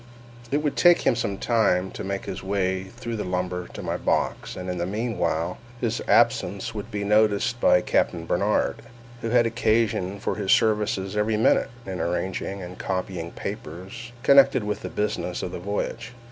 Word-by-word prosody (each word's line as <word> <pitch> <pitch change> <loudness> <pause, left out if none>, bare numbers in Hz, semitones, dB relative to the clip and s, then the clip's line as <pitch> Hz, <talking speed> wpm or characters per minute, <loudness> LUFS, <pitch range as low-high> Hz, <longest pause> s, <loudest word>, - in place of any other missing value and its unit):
It 145 +3 0
would 150 - 0
take 175 -1 +6
him - - +3
some 100 -4 -2
time 95 -6 +2
to - - -6
make 100 0 -3
his - - -5
way 95 -1 -1
through 115 +3 -6
the 105 - -2
lumber 90 -1 -2
to - - -7
my - - -2
box, - - -1
and 90 - -6
in 90 -1 -3
the 85 - -1
meanwhile 90 -6 -1 0.2
his 115 -2 -1
absence 105 -3 +2
would 105 0 -6
be 105 -2 -3
noticed 110 +3 +2
by 90 - +5
Captain 85 -1 0
Barnard, 100 +5 +1 0.4
who 115 - -2
had 120 0 +4
occasion 110 -4 +1
for - - -1
his 100 -3 0
services 105 -2 +2
every 105 +1 +1
minute, 110 - +3 0.2
in 95 -1 -5
arranging 95 +2 -2
and 90 +1 -9
copying 90 -3 -3
papers 95 +9 -7
connected 135 -3 +6
with 105 0 -3
the - - -5
business 105 -4 -2
of 90 - -3
the 90 - -5
voyage. 110 +5 -4
100 Hz, 175 wpm, -25 LUFS, 90-115 Hz, 0.4 s, take